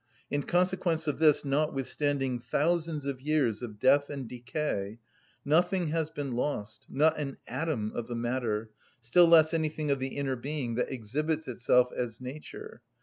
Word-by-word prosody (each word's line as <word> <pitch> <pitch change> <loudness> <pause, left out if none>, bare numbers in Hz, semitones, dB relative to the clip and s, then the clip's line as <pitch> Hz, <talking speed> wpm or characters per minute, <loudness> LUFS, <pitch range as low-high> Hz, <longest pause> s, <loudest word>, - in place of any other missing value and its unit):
In 145 - +1
consequence 175 -1 +1
of 150 -1 -2
this, 155 -2 +4
notwithstanding 140 -2 0
thousands 160 +2 0
of 135 -2 -3
years 140 -7 +1
of 110 -4 -7
death 140 +5 +4
and 140 -4 -5
decay, 120 -4 -3 0.5
nothing 175 +3 +2
has 160 0 0
been 145 -4 -4
lost, 120 -4 -3
not 155 +3 +3
an 140 -2 -4
atom 130 -10 -2
of 120 - -4
the 120 - -4
matter, 115 -2 -2 0.3
still 125 +10 +5
less 160 -1 +6
anything 155 -2 -1
of 140 - +1
the 130 0 -4
inner 135 -2 -1
being, 130 -1 -3
that 125 +3 -1
exhibits 150 +7 -2
itself 125 0 +3
as 115 -2 -4
nature. 155 - -9
140 Hz, 155 wpm, -29 LUFS, 125-155 Hz, 0.5 s, less